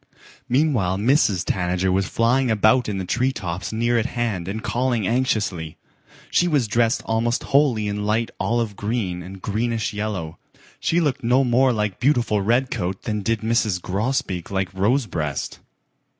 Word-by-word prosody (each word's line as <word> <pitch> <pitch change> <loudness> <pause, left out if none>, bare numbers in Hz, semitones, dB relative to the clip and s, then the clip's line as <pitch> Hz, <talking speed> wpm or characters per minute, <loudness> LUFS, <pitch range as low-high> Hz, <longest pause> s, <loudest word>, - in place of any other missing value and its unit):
Meanwhile 125 - +2
Mrs. 105 - +2
Tanager 90 0 0
was 95 0 +1
flying 125 +3 +2
about 110 +2 +3
in 100 - -2
the 95 - -3
tree 125 +7 +1
tops 90 -7 -5
near 120 +2 +1
at 115 - -1
hand 110 -9 -2
and 110 +3 -4
calling 120 -3 0
anxiously. 105 -10 -1 0.5
She 175 - +3
was 145 -8 +1
dressed 115 +2 +1
almost 115 +1 0
wholly 135 -7 +2
in 105 0 -2
light 110 +2 0
olive 115 -3 0
green 100 -5 -2
and 95 +1 -10
greenish 110 +1 -1
yellow. 105 -7 -4 0.4
She 170 - +1
looked 145 -8 0
no 125 +3 +3
more 125 +1 +3
like 105 -4 -2
beautiful 120 -6 +2
Redcoat 110 -4 0
than 105 -2 -2
did 115 +2 -1
Mrs. 110 -4 +1
Grosbeak 95 -2 -2
like 95 -1 -2
Rosebreast. 95 - -1
110 Hz, 150 wpm, -22 LUFS, 95-120 Hz, 0.5 s, about